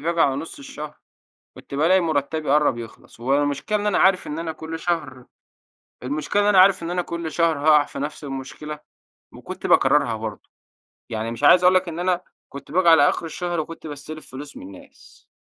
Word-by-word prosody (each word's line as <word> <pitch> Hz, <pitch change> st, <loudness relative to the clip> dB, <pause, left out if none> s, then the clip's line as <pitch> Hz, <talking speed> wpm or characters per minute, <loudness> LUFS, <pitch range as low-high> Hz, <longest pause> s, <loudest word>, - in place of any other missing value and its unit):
باجي 170 Hz, +1 st, -1 dB
على 135 Hz, -4 st, +3 dB
نُص 160 Hz, -, -7 dB
الشهر 155 Hz, -, -8 dB, 0.6 s
كنت -, -, -11 dB
بالاقى 170 Hz, +6 st, +4 dB
مرتّبي 155 Hz, -2 st, -1 dB
قرّب 145 Hz, -4 st, +3 dB
يخلص، 115 Hz, 0 st, -12 dB
والمشكلة 145 Hz, -, 0 dB
إن 205 Hz, -, -3 dB
أنا 205 Hz, -, +2 dB
عارف 190 Hz, -1 st, +3 dB
إن 150 Hz, -, -5 dB
أنا 165 Hz, -1 st, -3 dB
كل 160 Hz, +1 st, -7 dB
شهر 145 Hz, -8 st, -3 dB, 0.8 s
المشكلة 150 Hz, +9 st, -1 dB
إن -, -, +2 dB
أنا 200 Hz, -3 st, +5 dB
عارف 190 Hz, -2 st, +5 dB
إن 170 Hz, -, -3 dB
أنا 180 Hz, 0 st, 0 dB
كل 170 Hz, -2 st, -5 dB
شهر 165 Hz, -1 st, +1 dB
هاقع 150 Hz, 0 st, +5 dB
في -, -, -8 dB
نفس 150 Hz, +2 st, -5 dB
المشكلة، 145 Hz, +2 st, -7 dB, 0.5 s
وكنت -, -, -7 dB
باكررها -, -, +3 dB
برضو. -, -, -7 dB, 0.6 s
يعني 110 Hz, +1 st, -3 dB
مش 115 Hz, -, -8 dB
عايز 180 Hz, -, +7 dB
أقول 180 Hz, +1 st, +6 dB
لك 185 Hz, -1 st, +2 dB
إن 165 Hz, +1 st, -6 dB
أنا 180 Hz, 0 st, 0 dB, 0.3 s
كنت 140 Hz, +1 st, -11 dB
باجي 170 Hz, 0 st, +4 dB
على 150 Hz, -3 st, +7 dB
آخر -, -, -3 dB
الشهر 175 Hz, +1 st, -3 dB
وكنت 160 Hz, 0 st, -6 dB
باستلف 150 Hz, +1 st, -9 dB
فلوس 140 Hz, +2 st, -9 dB
من -, -, -10 dB
الناس، -, -, -18 dB
155 Hz, 190 wpm, -22 LUFS, 145-175 Hz, 0.8 s, عايز